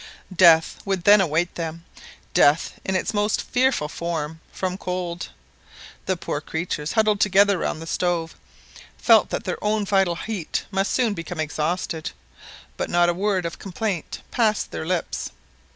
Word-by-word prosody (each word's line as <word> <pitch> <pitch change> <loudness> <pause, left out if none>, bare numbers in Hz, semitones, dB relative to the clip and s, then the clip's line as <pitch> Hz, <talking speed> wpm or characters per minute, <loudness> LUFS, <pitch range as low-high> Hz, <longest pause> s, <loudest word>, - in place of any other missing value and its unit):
Death 165 -3 +6
would 195 -3 -2
then 205 +1 +7
await 170 0 0
them 165 0 -5 0.5
death 145 +3 +3
in 190 - -1
its 185 - -1
most 205 0 +1
fearful 250 - +1
form, 160 -1 -4
from 185 -1 -3
cold. 180 -2 -4 0.8
The 185 - +1
poor 145 -3 -3
creatures, 160 -1 -3
huddled 215 -2 +3
together 200 -1 +4
round 160 0 -2
the - - -8
stove, 170 -1 -1 0.6
felt - - +5
that - - -3
their - - -4
own 210 0 +1
vital 195 -3 +2
heat 195 -2 -4
must 195 0 0
soon 240 -5 +2
become 170 -2 -6
exhausted, 155 +1 -2 0.7
but - - -2
not 175 0 +3
a - - +2
word 190 0 0
of 170 - -5
complaint 195 -2 -4
passed 220 -4 +1
their 160 - -5
lips. 180 -1 -2
180 Hz, 150 wpm, -23 LUFS, 165-200 Hz, 0.8 s, then